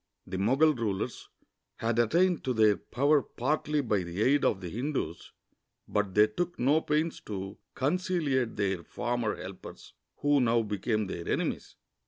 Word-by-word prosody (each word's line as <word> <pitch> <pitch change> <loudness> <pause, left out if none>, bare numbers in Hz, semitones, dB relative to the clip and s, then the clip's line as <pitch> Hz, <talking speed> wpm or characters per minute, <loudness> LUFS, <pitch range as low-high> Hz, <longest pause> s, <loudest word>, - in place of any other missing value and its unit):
The 95 0 -4
]Mogul 135 +10 +4
rulers 110 -7 -3 0.5
had 115 0 -1
attained 170 +9 +3
to 130 - +1
their 110 -2 +5
power 140 +7 +2
partly 150 +4 -1
by 110 -7 0
the 90 +4 -2
aid 140 +3 +3
of 95 - +2
the 90 - -6
Hindus, 120 - -3 0.6
but 105 -2 -1
they 105 +1 +7
took 175 +12 -3
no 145 +6 +3
pains 155 +2 -1
to 95 -2 -5 0.2
conciliate 145 -5 0
their 95 -4 -1
former 120 0 -2
helpers, 95 0 -10 0.3
who 145 -1 +3
now 115 -1 +3
became 105 +1 -1
their 85 -3 -6
enemies. - - -2
120 Hz, 150 wpm, -29 LUFS, 105-145 Hz, 0.6 s, they